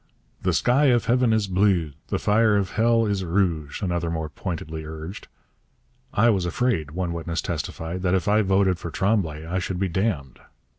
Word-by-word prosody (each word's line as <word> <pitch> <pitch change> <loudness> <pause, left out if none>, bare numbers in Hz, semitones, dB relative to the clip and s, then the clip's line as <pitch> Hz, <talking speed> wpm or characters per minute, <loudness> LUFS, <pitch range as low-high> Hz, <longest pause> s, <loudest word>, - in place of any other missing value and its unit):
'The - - +1
sky 130 +5 +3
of 120 -4 +3
heaven 125 0 +3
is 110 -2 +2
bleu, 95 -4 +2 0.2
the - - -1
fire 105 0 +3
of 100 -2 -1
hell 115 +1 +3
is 100 -2 -1
rouge,' 85 -3 -1
another 85 -2 -1
more 80 -1 -3
pointedly 80 +1 -5
urged. 80 +5 -8 0.9
'I 115 +3 +5
was 95 -4 0
afraid,' 85 - 0
one 85 +2 -3
witness 85 -1 -3
testified, 80 +2 -4
'that 90 0 +2
if 90 -3 -1
I 105 +1 +4
voted 95 -2 +2
for 85 - -5
Tremblay 85 -4 0
I 90 +3 -2
should 90 0 -3
be 95 0 0
damned.' 85 - -2
95 Hz, 180 wpm, -24 LUFS, 80-105 Hz, 0.9 s, I